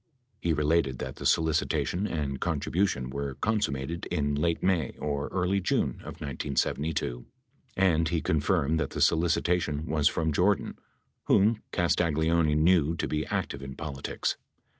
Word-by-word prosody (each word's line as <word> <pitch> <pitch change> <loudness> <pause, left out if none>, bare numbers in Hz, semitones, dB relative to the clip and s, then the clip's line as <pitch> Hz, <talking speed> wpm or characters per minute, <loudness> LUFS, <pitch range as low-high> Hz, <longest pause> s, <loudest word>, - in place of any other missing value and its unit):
He 85 - 0
related 75 -3 +1
that - - -6
the - - -1
solicitation 80 +4 +1
and 70 -6 -3
contribution 80 -7 0
were 70 -1 -4
consummated 85 -4 -1
in 75 -1 -1
late 80 +3 0
May 90 -4 +1
or 70 -1 -2
early 95 +1 0
J - - +1
une - - +2
of - - -9
1972, 70 -1 -2 0.5
and 85 -4 +3
he 85 -1 +1
confirmed 80 0 +1
that - - -1
the - - -6
solicitation 80 -2 +2
was 75 -2 +2
from 80 -1 0
Jordan, 95 +6 +1 0.5
whom 110 +3 +3
Castagleoni 80 -2 +2
knew 80 0 +3
to - - -2
be 75 0 -2
active 70 - -3
in 65 -1 -7
politics. 70 -3 -3
80 Hz, 140 wpm, -28 LUFS, 70-85 Hz, 0.5 s, and